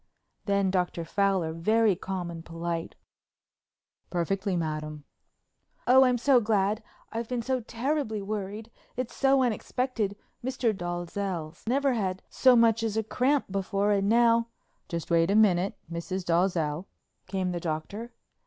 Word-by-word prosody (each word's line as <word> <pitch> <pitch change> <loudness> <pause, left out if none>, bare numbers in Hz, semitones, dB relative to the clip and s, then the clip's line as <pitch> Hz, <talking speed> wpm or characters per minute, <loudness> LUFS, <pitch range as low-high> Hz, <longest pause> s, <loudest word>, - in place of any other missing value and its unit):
Then 200 -2 +2
Dr. 180 -2 -1
Fowler, 190 -3 +1
very 215 +5 +3
calm 180 -1 -4
and 165 -1 -8
polite: 165 0 -4 1.1
"Perfectly, 190 +2 -1
madam." 155 -2 -3 0.8
"Oh, 260 +2 +7
I'm 250 -1 +3
so 255 +1 +5
glad—I've 215 +2 -2
been 245 -2 -2
so 260 +1 0
terribly 240 0 -2
worried. 210 +2 -5 0.3
It's 250 -2 -3
so 270 -1 +4
unexpected. 235 -2 -1 0.3
Mr. 245 -4 0
Dalzell's 175 -1 -4
never 275 +2 +2
had 190 -5 -2
so 255 -1 +5
much 230 -1 +4
as 220 -1 -1
a 220 - +1
cramp 255 +2 +1
before 195 +1 0
and 200 0 +2
now——" 230 0 +4 0.4
"Just 170 -1 -4
wait 165 +1 +4
a 200 - +3
minute, 195 -3 +3
Mrs. 180 +2 -4
Dalzell," 170 -2 +1 0.4
came 190 -2 -1
the 175 - -2
Doctor. 170 +8 -4
200 Hz, 135 wpm, -28 LUFS, 175-230 Hz, 1.1 s, Oh